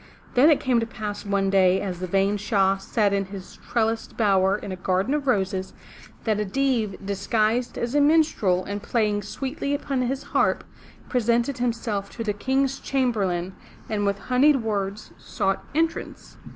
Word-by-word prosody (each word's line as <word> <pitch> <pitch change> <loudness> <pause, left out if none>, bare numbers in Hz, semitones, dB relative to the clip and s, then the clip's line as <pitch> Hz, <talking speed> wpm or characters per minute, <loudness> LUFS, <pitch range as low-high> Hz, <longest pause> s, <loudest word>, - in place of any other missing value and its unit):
Then 265 +5 +6
it 305 - +4
came 250 -3 +2
to 230 - -2
pass 210 -2 -5
one 200 -1 0
day 190 -1 +4
as 185 -3 -4
the 185 - -3
vain 195 +2 +2
Shah 195 -2 +2
sat 200 +1 0
in 195 0 0
his 190 -1 -10
trellised 225 -1 -2
bower 195 -2 +3
in 200 - -7
a - - -3
garden 185 +7 0
of 295 -2 -1
roses, 190 -5 0 0.5
that 215 -2 0
a - - +1
Deev, 225 -2 0
disguised 215 +4 0
as 235 +1 -2
a 290 - +4
minstrel 285 - +3
and 200 +1 -5
playing 210 -3 0
sweetly 275 +7 -3
upon 275 -2 -2
his 265 +2 -2
harp, - - +1 0.4
presented 240 +1 +1
himself 230 -4 -2
to 230 - -2
the 210 -2 -1
King's 265 +5 0
chamberlain 195 -9 -1 0.4
and 210 -1 0
with 200 0 +1
honeyed 260 +3 +3
words 205 -1 -3
sought 195 -2 -2
entrance. 330 +1 -2
215 Hz, 165 wpm, -24 LUFS, 195-250 Hz, 0.5 s, Then